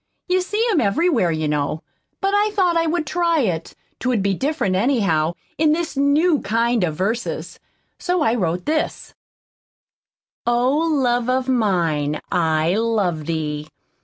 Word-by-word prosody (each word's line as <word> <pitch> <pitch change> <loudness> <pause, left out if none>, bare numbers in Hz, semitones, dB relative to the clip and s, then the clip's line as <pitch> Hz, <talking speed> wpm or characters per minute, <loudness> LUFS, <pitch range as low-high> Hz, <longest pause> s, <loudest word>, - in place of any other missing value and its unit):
You 370 0 +2
see 420 +6 -1
'em 325 - +2
everywhere, 230 - +2
you 155 -1 -1
know. 150 +1 -2 0.4
But 390 0 +1
I 415 +1 +3
thought 365 -4 +2
I 330 0 +2
would 330 0 0
try 335 +1 +1
it 170 -8 -2 0.2
'twould 250 -6 0
be 200 0 +1
different, 265 - -1
anyhow, 185 - +1 0.3
in 310 -1 +4
this 335 -1 -2
new 290 +3 +3
kind 230 +1 +1
of 160 -3 -1
verses. 215 +8 -3 0.4
So 360 -3 0
I 225 - +2
wrote 180 -6 -1
this: 310 0 -2 1.3
Oh, 245 +3 +2
love 260 -7 +1
of 255 0 0
mine, 170 - +1
I 160 -2 +1
love 205 -9 0
Thee. 150 -2 -3
235 Hz, 145 wpm, -21 LUFS, -, 1.3 s, in